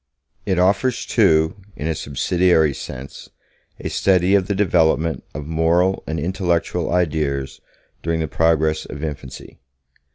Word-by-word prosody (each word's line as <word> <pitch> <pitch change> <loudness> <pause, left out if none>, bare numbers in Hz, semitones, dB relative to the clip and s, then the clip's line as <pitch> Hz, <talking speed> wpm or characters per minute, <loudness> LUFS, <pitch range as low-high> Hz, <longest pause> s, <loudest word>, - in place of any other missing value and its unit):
It 95 - +1
offers, 100 +8 +1
too, 80 +3 +3 0.2
in 75 - -6
a 80 - 0
subsidiary 80 +1 +1
sense, 65 +1 -9 0.5
a - - -4
study 95 0 +2
of 95 -2 +3
the 100 - -1
development 80 -6 +2
of 75 0 -5
moral 85 +4 +1
and 80 0 -2
intellectual 85 0 -1
ideas 75 -6 -1 0.4
during 80 0 -1
the 80 - -1
progress 80 0 +1
of 70 +2 -8
infancy. 70 -4 -7
80 Hz, 130 wpm, -20 LUFS, 75-90 Hz, 0.5 s, too